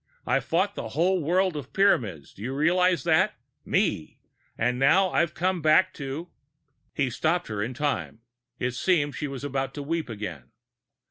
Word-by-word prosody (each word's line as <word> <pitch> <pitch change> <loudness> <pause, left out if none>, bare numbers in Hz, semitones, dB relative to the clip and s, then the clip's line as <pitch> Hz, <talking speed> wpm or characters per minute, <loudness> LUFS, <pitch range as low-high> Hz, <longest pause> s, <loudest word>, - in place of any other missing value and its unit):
I - - +2
fought 190 +5 0
a - - -4
whole 175 +9 +1
world 180 +3 +1
of 145 -4 -7
Pyramids, 115 - +1
do - - -14
you 130 +5 -3
realize 180 +4 +3
that? 160 -2 +3 0.3
Me! 75 - 0 0.4
And 125 +2 0
now 180 +8 +4
I 170 - +4
come 180 +2 -1
back 155 +5 +4
to 140 +4 -5 0.3
" 145 -3 -46
He 135 -3 0
stopped 170 +6 0
her 105 -1 -3
in 120 +4 -3
time; 145 -5 -2 0.4
it 125 - -1
seemed 145 +2 +1
she 150 - -3
was 135 -1 -7
about 135 -1 -3
to 145 - -5
weep 160 -1 -2
again. 95 - -6
145 Hz, 175 wpm, -26 LUFS, 125-175 Hz, 0.4 s, now